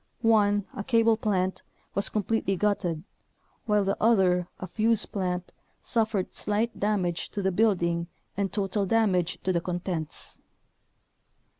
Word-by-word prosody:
One, 205 Hz, -3 st, +4 dB
a 215 Hz, -6 st, -5 dB
cable 230 Hz, -1 st, +4 dB
plant, 190 Hz, -4 st, -1 dB, 0.3 s
was 200 Hz, -, +2 dB
completely 210 Hz, -1 st, 0 dB
gutted, 180 Hz, -5 st, 0 dB, 0.6 s
while 210 Hz, -1 st, +3 dB
the 195 Hz, 0 st, 0 dB
other, 185 Hz, -6 st, +3 dB
a -, -, -4 dB
fuze 220 Hz, +4 st, +1 dB
plant, 180 Hz, -2 st, -3 dB, 0.3 s
suffered 220 Hz, -5 st, 0 dB
slight 220 Hz, +3 st, -1 dB
damage 190 Hz, -5 st, 0 dB
to 200 Hz, -, -4 dB
the 190 Hz, -, +2 dB
building 175 Hz, -4 st, +1 dB, 0.3 s
and 200 Hz, -1 st, -1 dB
total 200 Hz, -1 st, -1 dB
damage 185 Hz, -6 st, +2 dB
to 185 Hz, -, +1 dB
the 170 Hz, -, +1 dB
contents. 175 Hz, -3 st, -3 dB
200 Hz, 130 wpm, -27 LUFS, 180-215 Hz, 0.6 s, One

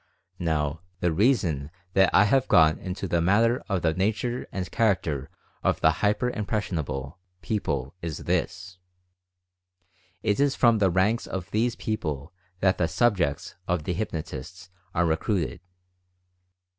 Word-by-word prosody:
Now, 80 Hz, -2 st, -1 dB, 0.2 s
the 90 Hz, -2 st, +1 dB
reason 85 Hz, -, +2 dB, 0.2 s
that 95 Hz, -1 st, +5 dB
I 105 Hz, -, +6 dB
have 130 Hz, +5 st, +3 dB
gone 80 Hz, -1 st, +5 dB
into 95 Hz, +1 st, -4 dB
the 85 Hz, -1 st, +1 dB
matter 115 Hz, +7 st, +3 dB
of 95 Hz, -4 st, 0 dB
the 80 Hz, -1 st, +2 dB
nature 110 Hz, +7 st, -1 dB
and 90 Hz, -3 st, -4 dB
character 85 Hz, -, 0 dB, 0.3 s
of -, -, +1 dB
the -, -, +5 dB
"hyper 105 Hz, +4 st, +2 dB
impression 105 Hz, -5 st, -2 dB
able" 70 Hz, 0 st, -5 dB, 0.2 s
people 70 Hz, -, -2 dB
is 85 Hz, -3 st, -4 dB
this: 90 Hz, 0 st, -2 dB, 1.4 s
It 105 Hz, +1 st, +1 dB
is 140 Hz, -1 st, +3 dB
from 115 Hz, -3 st, +4 dB
the 95 Hz, -2 st, +4 dB
ranks 95 Hz, +6 st, +1 dB
of 95 Hz, 0 st, -5 dB
these 115 Hz, +2 st, +1 dB
people 75 Hz, -, -3 dB, 0.3 s
that 95 Hz, -1 st, +3 dB
the 85 Hz, -, +2 dB
"subjects" 90 Hz, -5 st, +1 dB
of 90 Hz, -3 st, 0 dB
the 90 Hz, -, -1 dB
hypnotists 90 Hz, -1 st, -5 dB, 0.2 s
are 85 Hz, -, +3 dB
re 80 Hz, -1 st, +2 dB
cruited. 90 Hz, -3 st, -2 dB
90 Hz, 145 wpm, -26 LUFS, 80-105 Hz, 1.4 s, I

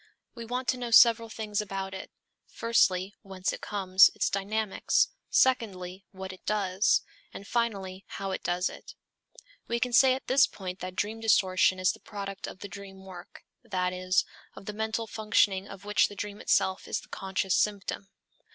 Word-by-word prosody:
We 235 Hz, -1 st, -8 dB
want 250 Hz, +2 st, -3 dB
to 255 Hz, -, +1 dB
know 245 Hz, -1 st, -4 dB
several 230 Hz, 0 st, +6 dB
things 215 Hz, -2 st, -3 dB
about 195 Hz, -2 st, -5 dB
it; 190 Hz, -, -7 dB, 0.4 s
firstly, 195 Hz, -4 st, +1 dB
whence 190 Hz, -2 st, -3 dB
it -, -, -7 dB
comes, 190 Hz, -2 st, +5 dB
its -, -, 0 dB
dynamics; 205 Hz, +1 st, +1 dB, 0.2 s
secondly, 195 Hz, -7 st, +1 dB
what 190 Hz, -1 st, -8 dB
it 185 Hz, -, -15 dB
does; 200 Hz, -1 st, +2 dB, 0.3 s
and 200 Hz, -, -9 dB
finally, 195 Hz, -5 st, -2 dB
how 195 Hz, -1 st, -5 dB
it -, -, -3 dB
does 180 Hz, +1 st, 0 dB
it. -, -, -10 dB, 0.7 s
We 235 Hz, 0 st, -1 dB
can 250 Hz, 0 st, -1 dB
say 260 Hz, +1 st, +6 dB
at 265 Hz, -, -8 dB
this 270 Hz, +2 st, +5 dB
point 185 Hz, -1 st, -7 dB
that 185 Hz, 0 st, -6 dB
dream 215 Hz, +3 st, -2 dB
distortion 185 Hz, -4 st, +3 dB
is 185 Hz, -1 st, +3 dB
the -, -, -12 dB
product 195 Hz, -2 st, -7 dB
of -, -, -10 dB
the 205 Hz, -, -5 dB
dream 195 Hz, 0 st, -11 dB
work, 180 Hz, -2 st, -12 dB, 0.2 s
that 185 Hz, -5 st, -1 dB
is, 185 Hz, 0 st, +1 dB, 0.3 s
of -, -, -11 dB
the 210 Hz, -, -5 dB
mental 220 Hz, +1 st, -2 dB
functioning 205 Hz, -3 st, +1 dB
of 195 Hz, -1 st, -11 dB
which 210 Hz, 0 st, +3 dB
the 205 Hz, -, -11 dB
dream 205 Hz, +1 st, -6 dB
itself 190 Hz, 0 st, +1 dB
is -, -, -2 dB
the -, -, -17 dB
conscious 190 Hz, -1 st, -2 dB
symptom. 200 Hz, -1 st, -1 dB
195 Hz, 180 wpm, -28 LUFS, 190-220 Hz, 0.7 s, several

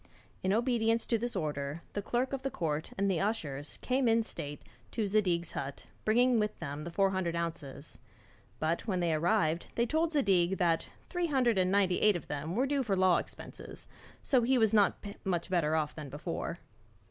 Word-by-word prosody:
In 190 Hz, -, +1 dB
obedience 230 Hz, 0 st, +2 dB
to 230 Hz, -, +1 dB
this 240 Hz, 0 st, -3 dB
order, 150 Hz, -2 st, -3 dB
the 205 Hz, -, -2 dB
clerk 245 Hz, +6 st, -1 dB
of 270 Hz, -, -2 dB
the 270 Hz, -, -1 dB
court 155 Hz, -, -2 dB
and 200 Hz, +1 st, +1 dB
the 185 Hz, -4 st, +1 dB
ushers 155 Hz, -9 st, -2 dB
came 255 Hz, 0 st, +2 dB
in 225 Hz, 0 st, +4 dB
state 145 Hz, -8 st, -7 dB, 0.3 s
to 215 Hz, -, -1 dB
Zadig's 185 Hz, -5 st, +1 dB
hut, 140 Hz, 0 st, -5 dB, 0.2 s
bringing 240 Hz, +2 st, +4 dB
with 210 Hz, 0 st, -1 dB
them 145 Hz, +2 st, -5 dB
the -, -, -4 dB
four 195 Hz, +2 st, +2 dB
hundred 185 Hz, -3 st, -1 dB
ounces; 155 Hz, -4 st, -5 dB, 0.6 s
but, 165 Hz, +7 st, -1 dB
when 185 Hz, -4 st, 0 dB
they 170 Hz, -2 st, +1 dB
arrived, 170 Hz, 0 st, +1 dB
they 235 Hz, -, +2 dB
told 320 Hz, +6 st, +1 dB
Zadig 190 Hz, -, +3 dB
that 170 Hz, -3 st, +1 dB, 0.2 s
three 355 Hz, -1 st, -1 dB
hundred 250 Hz, -8 st, +2 dB
and 185 Hz, 0 st, +2 dB
ninety 195 Hz, -2 st, +3 dB
eight 210 Hz, -2 st, +5 dB
of 175 Hz, -, -6 dB
them 150 Hz, +4 st, -3 dB
were 255 Hz, +4 st, +2 dB
due 280 Hz, 0 st, +1 dB
for 215 Hz, -6 st, 0 dB
law 185 Hz, -2 st, +4 dB
expenses, -, -, -8 dB, 0.4 s
so 260 Hz, -3 st, +3 dB
he 255 Hz, +3 st, +3 dB
was 220 Hz, -2 st, +3 dB
not 205 Hz, -1 st, +3 dB, 0.2 s
much 180 Hz, -2 st, -2 dB
better 160 Hz, -4 st, +2 dB
off 155 Hz, -2 st, 0 dB
than 150 Hz, -3 st, -7 dB
before. 165 Hz, +4 st, -4 dB
190 Hz, 195 wpm, -31 LUFS, 165-230 Hz, 0.6 s, eight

